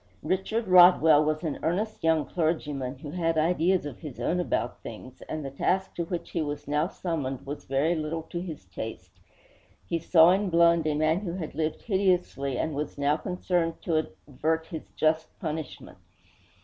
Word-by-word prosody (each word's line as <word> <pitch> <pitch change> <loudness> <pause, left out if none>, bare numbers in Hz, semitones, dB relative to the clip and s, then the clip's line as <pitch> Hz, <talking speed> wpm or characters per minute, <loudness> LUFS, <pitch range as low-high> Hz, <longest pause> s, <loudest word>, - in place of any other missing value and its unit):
Richard 210 +4 -1
Rodwell 175 -4 +7
was 155 +2 -1
an 155 -4 -3
earnest 210 +6 -2
young 160 -2 +3
clergyman, 150 -6 -2
who 145 +2 -8
had 165 -1 0
ideas 175 +2 +2
of 145 -5 -7
his 150 -6 -9
own 180 - 0
about 125 -8 -1
things; 120 +3 -10
and 155 -2 -4
the 135 - -5
task 190 +7 0
to 170 - -3
which 175 0 -5
he 170 - -1
was 145 -1 -4
now 150 +3 +1
summoned 145 -9 -4
was 145 +2 -6
very 140 +5 +1
little 160 0 -3
to 170 +1 -5
his 160 - -7
taste. 90 -3 -8 0.7
He 170 - -1
saw 165 +1 +6
in 195 +1 +1
Blund 170 -1 +4
a 150 - +1
man 155 +3 +2
who 185 -4 -4
had 175 -4 -5
lived 155 +1 -2
hideously 180 - 0
and 160 - -1
was 145 +1 -4
now 145 +1 +2
concerned 175 -1 -1
to 160 -2 +1 0.2
avert 160 +4 -1
his 160 -1 -8
just 155 0 0
punishment. 155 -3 -6
160 Hz, 175 wpm, -27 LUFS, 150-175 Hz, 0.7 s, Rodwell